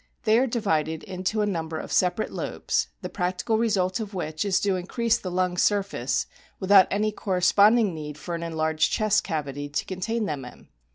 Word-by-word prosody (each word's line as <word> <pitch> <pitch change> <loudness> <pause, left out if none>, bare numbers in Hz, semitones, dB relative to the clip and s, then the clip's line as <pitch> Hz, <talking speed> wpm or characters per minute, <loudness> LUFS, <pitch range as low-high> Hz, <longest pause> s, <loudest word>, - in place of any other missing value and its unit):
They 220 0 +4
are 265 - +2
divided 160 -9 -1
into 190 +3 -2
a - - +2
number 165 -5 -3
of - - -7
separate 185 +4 +1
lobes, - - -1 0.2
the - - -2
practical 185 +4 -1
result 195 -4 +1
of 210 -2 -6
which 155 -2 -3
is 195 -3 +2
to 200 -2 +1
increase 225 +6 0
the 185 - -5
lung 180 0 0
surface, 195 - +1 0.3
without 195 -1 +6
any 215 +2 0
corresponding 200 +2 +3
need 150 -2 -7
for 160 +4 -6
an 170 - -3
enlarged 160 -1 0
chest 215 -1 +2
cavity 145 -4 -4
to 145 - -2
contain 215 +5 -2
them 145 -7 -3
in. 125 - -13
185 Hz, 180 wpm, -25 LUFS, 160-210 Hz, 0.3 s, without